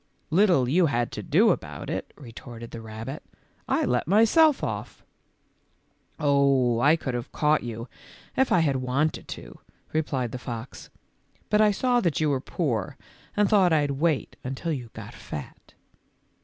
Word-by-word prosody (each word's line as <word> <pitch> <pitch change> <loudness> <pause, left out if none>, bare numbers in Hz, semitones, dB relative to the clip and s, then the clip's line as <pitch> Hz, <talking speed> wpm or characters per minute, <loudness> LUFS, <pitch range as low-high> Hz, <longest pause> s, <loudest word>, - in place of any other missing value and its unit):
"Little 175 -7 +4
you 170 +6 +3
had 120 -4 -1
to - - -5
do - - +4
about - - -4
it," - - -4
retorted 120 -3 -10
the 115 - -7
rabbit; 110 +5 -7 0.5
"I - - +1
let 125 +2 0
myself 230 - +5
off." - - -5 0.6
" - - -43 0.5
Oh, 140 -5 +3
I 145 +6 +5
could 135 -6 -4
have 120 +1 -4
caught 150 0 +2
you 115 0 -6 0.5
if 265 - +2
I 175 - +5
had 140 -4 +1
wanted 130 +5 -1
to," - - -9 0.3
replied 135 -6 -1
the 125 - -5
fox, 120 0 -7
w - - -37
but 210 - +4
I 215 - +6
saw 245 +4 +2
that 170 -8 0
you 155 -2 +2
were 135 -2 0
poor 130 - -2 0.4
and 210 -1 +4
thought 195 -4 +4
I'd 145 -3 +2
wait 150 +1 -1
until 135 +6 -3
you 125 -5 -6
got 110 -1 -9
fat." 75 - -8
t? - - -24
140 Hz, 170 wpm, -26 LUFS, 120-170 Hz, 0.6 s, I